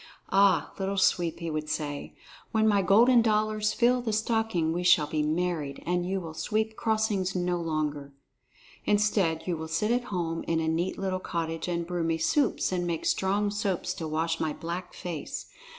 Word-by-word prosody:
"Ah, 195 Hz, 0 st, +4 dB
Little 195 Hz, +1 st, -1 dB
Sweep," 175 Hz, -3 st, +2 dB
he 165 Hz, -1 st, -3 dB
would 155 Hz, 0 st, -3 dB
say, 145 Hz, -2 st, -4 dB, 0.4 s
"when 220 Hz, 0 st, +3 dB
my 205 Hz, -2 st, +4 dB
golden 230 Hz, +6 st, +6 dB
dollars 215 Hz, -1 st, +1 dB
fill 250 Hz, +1 st, +3 dB
the 235 Hz, -2 st, -2 dB
stocking, 220 Hz, -7 st, 0 dB
we 175 Hz, -, -1 dB
shall 175 Hz, -4 st, +5 dB
be 150 Hz, +1 st, -1 dB
married, 155 Hz, -2 st, -1 dB
and 175 Hz, +1 st, 0 dB
you 195 Hz, 0 st, 0 dB
will 165 Hz, -3 st, -7 dB
sweep 220 Hz, +6 st, -1 dB
crossings 215 Hz, -5 st, 0 dB
no 180 Hz, -1 st, 0 dB
longer. 150 Hz, -3 st, -2 dB, 0.7 s
Instead, 205 Hz, -6 st, +2 dB
you 180 Hz, -, -1 dB
will 160 Hz, 0 st, -5 dB
sit 160 Hz, +8 st, 0 dB
at 245 Hz, 0 st, +1 dB
home 170 Hz, -6 st, -2 dB
in 165 Hz, -1 st, +1 dB
a 160 Hz, -, -1 dB
neat 165 Hz, +3 st, -1 dB
little 190 Hz, -1 st, -2 dB
cottage 165 Hz, -2 st, -3 dB
and 170 Hz, -1 st, -1 dB
brew 175 Hz, -1 st, -2 dB
me 165 Hz, 0 st, +1 dB
soups 270 Hz, -, +1 dB
and 175 Hz, -1 st, -1 dB
make 165 Hz, -2 st, -2 dB
strong 200 Hz, +2 st, +1 dB
soaps 200 Hz, -3 st, -1 dB
to 165 Hz, -4 st, -5 dB
wash 160 Hz, +1 st, -1 dB
my 155 Hz, -1 st, -1 dB
black 175 Hz, +2 st, -6 dB
face. 170 Hz, -5 st, -5 dB
180 Hz, 180 wpm, -28 LUFS, 160-210 Hz, 0.7 s, golden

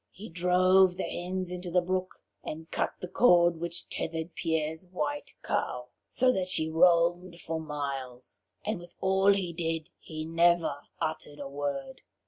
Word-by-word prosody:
He 205 Hz, +4 st, -10 dB
drove 180 Hz, +2 st, +4 dB
the -, -, -3 dB
hens 185 Hz, 0 st, -3 dB
into 180 Hz, 0 st, -5 dB
the 180 Hz, +1 st, +3 dB
brook, 185 Hz, +1 st, -3 dB, 0.2 s
and 160 Hz, +2 st, -7 dB
cut -, -, -1 dB
the 180 Hz, -, -4 dB
cord 175 Hz, -5 st, +5 dB
which 170 Hz, +1 st, -2 dB
tethered 160 Hz, +1 st, -3 dB
Pierre's 160 Hz, +1 st, -2 dB
white 145 Hz, -5 st, -4 dB
cow, 125 Hz, 0 st, -2 dB, 0.2 s
so 255 Hz, 0 st, +3 dB
that 190 Hz, -6 st, -1 dB
she 160 Hz, -3 st, +2 dB
roamed 170 Hz, +1 st, +3 dB
for 165 Hz, -1 st, -3 dB
miles. 135 Hz, -7 st, -5 dB, 0.3 s
And 215 Hz, -4 st, -1 dB
with 175 Hz, 0 st, -13 dB
all 190 Hz, +1 st, +4 dB
he 190 Hz, -4 st, 0 dB
did, 165 Hz, -1 st, -2 dB
he 155 Hz, -1 st, -6 dB
never 165 Hz, -2 st, +3 dB, 0.2 s
uttered 155 Hz, -2 st, -3 dB
a 140 Hz, -, -5 dB
word. 140 Hz, -1 st, -4 dB
170 Hz, 155 wpm, -29 LUFS, 155-180 Hz, 0.3 s, cord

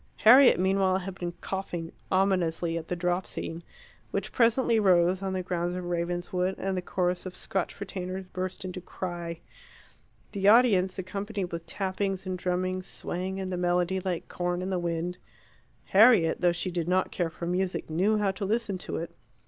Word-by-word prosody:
Harriet, 245 Hz, 0 st, +7 dB
meanwhile, 190 Hz, 0 st, +2 dB
had 190 Hz, 0 st, -5 dB
been 175 Hz, -1 st, -5 dB
coughing 175 Hz, -4 st, -4 dB, 0.2 s
ominously 180 Hz, -3 st, +1 dB
at 165 Hz, -1 st, -4 dB
the 180 Hz, -, -2 dB
drop 175 Hz, +1 st, -1 dB
scene, 165 Hz, +1 st, -5 dB, 0.5 s
which -, -, -3 dB
presently 235 Hz, -1 st, +3 dB
rose 185 Hz, -2 st, +4 dB
on 190 Hz, -1 st, -2 dB
the 185 Hz, -1 st, -2 dB
grounds 175 Hz, -1 st, -2 dB
of 180 Hz, -1 st, -4 dB
Ravenswood, 175 Hz, +2 st, -1 dB
and 195 Hz, 0 st, -2 dB
the 180 Hz, -, -1 dB
chorus 180 Hz, 0 st, -1 dB
of 185 Hz, -, -8 dB
Scotch 190 Hz, 0 st, -3 dB
retainers 190 Hz, -1 st, -5 dB
burst 185 Hz, +1 st, -4 dB
into 185 Hz, 0 st, -5 dB
cry. 175 Hz, -2 st, -5 dB, 0.9 s
The 200 Hz, -1 st, 0 dB
audience 205 Hz, -5 st, +5 dB
accompanied 200 Hz, 0 st, -4 dB
with 165 Hz, 0 st, -6 dB
tappings 195 Hz, +1 st, -2 dB
and 185 Hz, 0 st, -2 dB
drummings, 185 Hz, +1 st, -2 dB
swaying 185 Hz, +2 st, -4 dB
in 190 Hz, -1 st, -4 dB
the 180 Hz, -, -2 dB
melody 180 Hz, +1 st, +1 dB
like 185 Hz, -2 st, -3 dB
corn 175 Hz, 0 st, -2 dB
in 190 Hz, -, -3 dB
the 185 Hz, -, 0 dB
wind. 175 Hz, +1 st, -2 dB, 0.7 s
Harriet, 200 Hz, -5 st, +5 dB
though 175 Hz, -1 st, +4 dB
she 175 Hz, +2 st, -2 dB
did 170 Hz, -2 st, -2 dB
not 185 Hz, +1 st, +1 dB
care 175 Hz, -2 st, -1 dB
for 165 Hz, +1 st, -7 dB
music, 180 Hz, +1 st, -1 dB
knew 190 Hz, +7 st, +2 dB
how 205 Hz, -2 st, +1 dB
to 195 Hz, +2 st, -6 dB
listen 205 Hz, -1 st, -1 dB
to -, -, -4 dB
it. 165 Hz, -, -6 dB
185 Hz, 175 wpm, -28 LUFS, 175-195 Hz, 0.9 s, Harriet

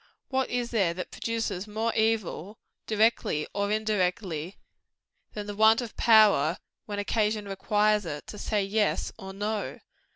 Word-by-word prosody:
_ -, -, -31 dB, 0.3 s
What 265 Hz, -1 st, 0 dB
is 245 Hz, -1 st, -2 dB
there 190 Hz, -7 st, +1 dB
that 180 Hz, -, -6 dB
produces 220 Hz, -4 st, -3 dB
more 220 Hz, +2 st, -1 dB
evil 220 Hz, -2 st, -1 dB, 0.3 s
directly 215 Hz, -8 st, +2 dB
or 200 Hz, 0 st, -1 dB
indirectly 190 Hz, -5 st, -1 dB, 0.8 s
than 210 Hz, -1 st, -5 dB
the 205 Hz, 0 st, -6 dB
want 220 Hz, +2 st, +5 dB
of 240 Hz, -3 st, -5 dB
power, 205 Hz, -8 st, +5 dB, 0.3 s
when 205 Hz, -1 st, -4 dB
occasion 210 Hz, 0 st, 0 dB
requires 210 Hz, +1 st, +1 dB
it, 150 Hz, -2 st, -5 dB
to 210 Hz, -, -9 dB
say 210 Hz, -2 st, 0 dB
YES, 210 Hz, +2 st, 0 dB
or 190 Hz, -2 st, -7 dB
NO? 205 Hz, +2 st, -3 dB
210 Hz, 150 wpm, -27 LUFS, 195-220 Hz, 0.8 s, want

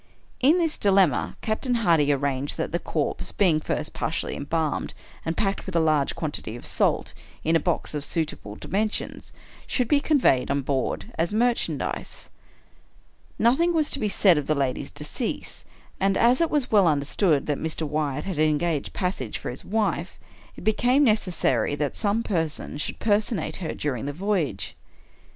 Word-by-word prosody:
In 295 Hz, +7 st, +5 dB
this 330 Hz, -3 st, 0 dB
dilemma, 190 Hz, -9 st, +3 dB
Captain 240 Hz, +3 st, 0 dB
Hardy 165 Hz, -10 st, +3 dB
arranged 140 Hz, 0 st, -1 dB
that 160 Hz, -, -2 dB
the 170 Hz, -, 0 dB
corpse, 155 Hz, -4 st, -2 dB
being 175 Hz, -6 st, +3 dB
first 155 Hz, 0 st, -3 dB
partially 155 Hz, -, -2 dB
embalmed, 155 Hz, +1 st, -2 dB, 0.3 s
and 165 Hz, -, -3 dB
packed, 195 Hz, -1 st, -1 dB
with 190 Hz, -, -5 dB
a -, -, +5 dB
large 155 Hz, -3 st, +2 dB
quantity 145 Hz, -7 st, -4 dB
of 120 Hz, -, -10 dB
salt, -, -, +1 dB, 0.3 s
in 165 Hz, +1 st, +2 dB
a -, -, +5 dB
box 170 Hz, 0 st, -2 dB
of 150 Hz, -1 st, -2 dB
suitable 150 Hz, -, -3 dB
dimensions, 210 Hz, -, -3 dB, 0.4 s
should 250 Hz, -3 st, 0 dB
be 290 Hz, -, +4 dB
conveyed 280 Hz, -, +3 dB
on 140 Hz, 0 st, +1 dB
board 135 Hz, -1 st, -2 dB
as 170 Hz, +3 st, +1 dB
merchandise. 235 Hz, +3 st, -1 dB, 1.1 s
Nothing 330 Hz, +9 st, +3 dB
was 310 Hz, -2 st, +2 dB
to 280 Hz, -, +1 dB
be 210 Hz, -, 0 dB
said 185 Hz, -5 st, +4 dB
of 145 Hz, -, -6 dB
the 155 Hz, -, +2 dB
lady's 135 Hz, -3 st, -1 dB
decease; -, -, -4 dB, 0.3 s
and, 195 Hz, 0 st, +2 dB
as 245 Hz, +6 st, +4 dB
it 335 Hz, -, +3 dB
was 290 Hz, -4 st, 0 dB
well 200 Hz, -4 st, +5 dB
understood 145 Hz, +1 st, +2 dB
that 145 Hz, -2 st, -1 dB
Mr. 160 Hz, 0 st, -1 dB
Wyatt 150 Hz, -1 st, -1 dB
had 190 Hz, -6 st, -4 dB
engaged 155 Hz, 0 st, +1 dB
passage 180 Hz, -, -2 dB
for -, -, -5 dB
his 125 Hz, -, -8 dB
wife, 195 Hz, -4 st, -1 dB, 0.4 s
it -, -, -11 dB
became 245 Hz, +7 st, +3 dB
necessary 180 Hz, -, +2 dB
that 145 Hz, -1 st, -2 dB
some 215 Hz, +1 st, 0 dB
person 160 Hz, -6 st, -2 dB
should 145 Hz, -, -3 dB
personate 205 Hz, -6 st, 0 dB
her 175 Hz, -4 st, -4 dB
during 135 Hz, -3 st, -2 dB
the 145 Hz, -, -3 dB
voyage. 175 Hz, -, -1 dB
165 Hz, 165 wpm, -25 LUFS, 145-215 Hz, 1.1 s, In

